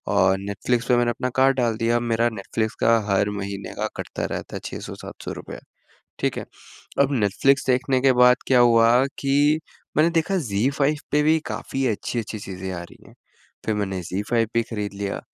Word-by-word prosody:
और 95 -1 +4
नेटफ्लिक्स 100 +5 -1
पे 125 - +4
मैंने 120 0 +2
अपना 125 +2 -3
कार्ड 135 0 +4
डाल 120 -3 +1
दिया 115 +1 +2
मेरा 115 0 +1
नेटफ्लिक्स 110 +1 -3
का 115 0 +5
हर 100 +1 +2
महीने 100 0 -5
का - - 0
कटता - - -4
रहता - - -7
है - - -3
600-700 - - -7
रुपये। - - -8 0.6
ठीक - - -1
है? - - -5 0.6
अब 140 0 +3
नेटफ्लिक्स 130 +4 +2
देखने 130 +1 +2
के 135 0 +5
बाद 125 0 +6
क्या 130 - +4
हुआ 115 -1 +6 0.3
कि 145 +2 +3 0.4
मैंने 160 +2 +4
देखा 170 +4 +1
ज़ी 100 +6 +1
फाइव 145 +2 +2 0.2
पे 150 - +4
भी 155 +2 +4
काफ़ी 135 -1 -3
अच्छी-अच्छी 110 0 -3
चीज़ें 95 -1 -6
आ 85 -1 -5
रही 85 - -15
हैं। - - -17 0.5
फिर 110 - +1
मैंने 95 -2 -2
ज़ी 90 +4 -3
फाइव 115 -2 +2
भी 115 - +3
खरीद 105 -3 -4
लिया 100 0 -3
115 Hz, 190 wpm, -23 LUFS, 100-130 Hz, 0.6 s, बाद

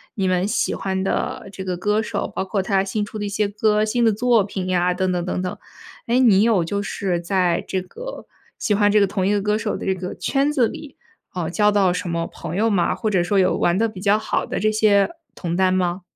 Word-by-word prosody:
你 195 -3 0
们 185 +1 +1
喜 210 - 0
欢 190 -1 -2
的 195 - -2
这 190 - -7
个 185 -1 -3
歌 210 +4 +1
手， - - -3
包 - - -1
括 195 +1 -1
他 190 0 +1
新 205 +2 -2
出 215 - -8
的 210 - -3
一 - - -3
些 205 +1 0
歌、 210 +1 +1
新 235 +2 0
的 225 - +5
作 230 0 +3
品 190 -2 -5
呀 180 -1 +1
等 185 0 0
等 175 -1 -1
等 180 - -2
等。 180 -1 -4 0.5
诶， 240 +2 +2
你 215 -7 +5
有 220 -7 +3
就 200 +5 -2
是 190 -3 -2
在 175 -1 +1
这 190 -1 -1
个 - - -9 0.3
喜 210 - 0
欢 205 0 +3
这 210 - +5
个 200 - +4
同 190 -1 -1
一 200 - +2
个 205 - +1
歌 210 +1 +1
手 215 -1 -2
的 - - -7
这 190 - +1
个 180 0 -5
圈 280 +1 0
子 260 -6 +2
里， 285 +2 -9 0.4
呃， 175 -3 -3
交 210 +3 +3
到 195 -3 +3
什 180 - -3
么 170 0 -2
朋 165 +2 -7
友 225 +2 +2
吗？ 190 -5 +1
或 220 - -2
者 185 -4 +2
说 195 +3 +1
有 185 - +2
玩 175 +1 +2
得 225 +2 +2
比 195 -4 -9
较 205 +1 +3
好 220 - -1
的 - - -3
这 215 +2 +2
些 210 -2 +3 0.2
同 170 -1 -4
担 185 0 +3
吗？ 180 0 0
195 Hz, 270 characters per minute, -21 LUFS, 185-215 Hz, 0.5 s, 的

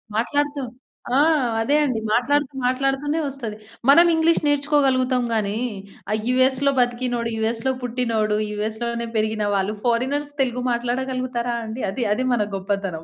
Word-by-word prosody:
మాట్లాడుతూ 285 +4 0 0.5
ఆ! - - +4 0.4
అదే 280 +6 +2
అండి. 250 -5 -1
మాట్లాడుతూ 285 +4 +1
మాట్లాడుతూనే 275 +4 0
ఒస్తది. 235 -6 -6 0.3
మనం 335 +5 +8
ఇంగ్లీష్ 325 +1 +3
నేర్చుకోగలుగుతాం 275 -3 +2
గానీ, 210 -1 0 0.5
ఆ - - +2
యూఎస్‌లో 260 +2 +3
బతికినోడు, 245 -1 0
యూఎస్‌లో 225 +3 0
పుట్టినోడు, 230 -4 0
యూఎస్‌లోనే 225 +3 -3
పెరిగిన 215 0 0
వాళ్ళు 195 +2 0
ఫారినర్స్ 260 +5 0
తెలుగు 250 -1 0
మాట్లాడగలుగుతారా 245 0 -2
అండి? 220 +3 -5
అది, 240 +5 -3
అది 255 +4 -1
మన 215 -4 +1
గొప్పతనం. 195 -4 -3
245 Hz, 125 wpm, -22 LUFS, 225-270 Hz, 0.5 s, మనం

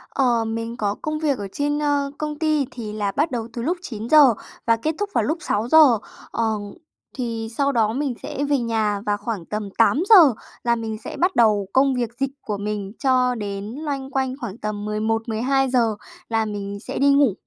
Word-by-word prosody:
Ờ, 240 -4 +2
mình 230 +1 -4
có 205 -1 -1
công 305 0 -2
việc 290 -5 +1
ở 200 -1 -5
trên, 290 +1 -1
ơ, 285 -1 0
công 300 -1 -4
ty 310 -3 +2
thì 215 -4 -6
là 205 -2 -1
bắt 300 +8 0
đầu 230 -2 -3
từ 235 - -4
lúc 340 +9 0
9:00 245 - +4 0.3
và 230 - +5
kết 310 +8 -2
thúc 410 -1 -1
vào - - +2
lúc 315 +3 0
6:00. 245 +3 +5 0.3
Ờ, 230 - -1 0.7
thì 230 -3 -3
sau 280 0 +2
đó 220 -3 +2
mình 275 -1 -1
sẽ 285 - -3
về 285 - +3
nhà 220 -3 0
và 205 0 +1
khoảng 205 -5 -4
tầm 210 -1 -4
8:00 380 +10 +5 0.5
là 235 0 +2
mình 220 -2 -4
sẽ - - -7
bắt 365 +2 +1
đầu 210 -4 +3
công 270 0 +4
việc 240 -3 -1
dịch 270 0 0
của 210 -2 -3
mình 205 -1 -4
cho 255 -2 +3
đến 200 -2 -4
loanh 270 +2 -5
quanh 265 -1 -1
khoảng 225 -2 -5
tầm 210 -2 -4
11:00-12:00 225 +3 +1 0.3
là 225 -1 +1
mình 200 -1 -5
sẽ - - -5
đi 280 +1 +4
ngủ, 280 -7 +4
235 Hz, 195 wpm, -22 LUFS, 215-280 Hz, 0.7 s, và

